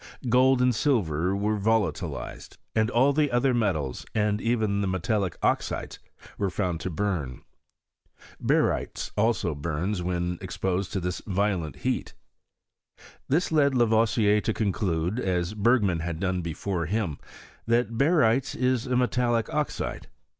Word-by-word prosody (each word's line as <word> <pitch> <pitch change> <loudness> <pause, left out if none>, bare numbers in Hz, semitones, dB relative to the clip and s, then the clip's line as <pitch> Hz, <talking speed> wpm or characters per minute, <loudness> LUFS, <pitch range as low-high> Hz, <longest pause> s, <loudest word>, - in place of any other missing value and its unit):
Gold 130 +1 +4
and 125 0 +3
silver 95 - +1
were 105 +1 0
volatilized; 110 +1 -2 0.3
all 130 +4 +4
the 150 0 +2
other 125 +2 +2
metals, 85 - -1
and 105 -1 +1
even 110 -4 +1
the 100 - 0
metallic 95 0 -1
oxides, - - -1 0.4
were 100 - +1
found 90 -3 -2
to 95 - -3
burn. 85 -8 -3 1.0
Barytes - - 0
also 105 -5 +1
burns 85 +6 -2
when 90 -1 -2
ex 95 -1 -7
posed 95 0 -1
to 100 - 0
this 90 -1 -3
violent 95 -7 0
heat. - - -1 1.1
This 165 +6 +1
led 140 -4 +3
Lavoisier 110 -3 +3
to 110 - -1
conclude, 95 -1 -1
as 90 -3 -1
Bergman 105 -5 +2
had 85 -1 -4
done 95 -1 -1
before 85 +1 -3
him, 95 -6 -2 0.5
that 115 -1 +1
Barytes 135 -3 +2
is 125 -2 0
a 125 - 0
metallic 120 -2 +1
oxide. 150 -1 -2
105 Hz, 130 wpm, -26 LUFS, 90-120 Hz, 1.1 s, Gold